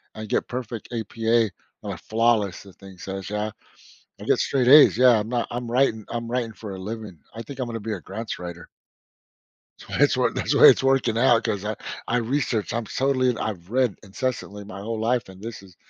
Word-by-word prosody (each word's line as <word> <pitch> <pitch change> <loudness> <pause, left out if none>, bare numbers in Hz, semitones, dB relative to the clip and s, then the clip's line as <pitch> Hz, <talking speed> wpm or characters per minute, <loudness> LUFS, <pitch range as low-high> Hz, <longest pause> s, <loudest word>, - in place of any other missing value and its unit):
and 110 -1 -7
get - - 0
perfect 120 -3 -5
APA 115 0 +1 0.3
and - - -4
a - - -8
flawless 110 -4 +1
the 100 -2 -14
thing 95 -1 -14
says, 95 +1 -6
yeah, 105 +1 -2 0.7
I - - -7
get - - +2
straight 130 -3 +1
A's. 145 +2 +8
Yeah, 125 -2 +6
I'm 105 - -5
not 120 -1 -1
I'm 120 0 -4
writing 120 -4 +2
I'm 115 0 -4
writing 120 -2 -1
for 105 -3 -8
a - - -7
living. 105 -2 -7 0.2
I 115 - -6
think 135 +4 -10
I'm 130 - -2
gonna 115 -1 -5
be 110 +1 -4
a 95 - -7
grants 110 +5 -6
writer. 85 -1 -8 1.1
That's - - -14
why - - +5
it's - - +3
wor - - +2
that's - - -1
why - - +5
it's - - +6
working 135 -4 +2
out 120 -1 +4
'cause 100 -2 -2
I 105 +1 -2 0.3
I 120 - +1
researched, 120 - -1
I'm 120 -1 -2
totally 130 +2 +1
and 120 - -1
I've 95 -5 -4
read 125 -3 +1
incessantly 105 -1 -4
my 100 -1 -9
whole 110 +2 -4
life 120 0 0
and 95 0 -13
this 115 -1 -7
is 95 -3 -17
115 Hz, 220 wpm, -24 LUFS, 100-120 Hz, 1.1 s, A's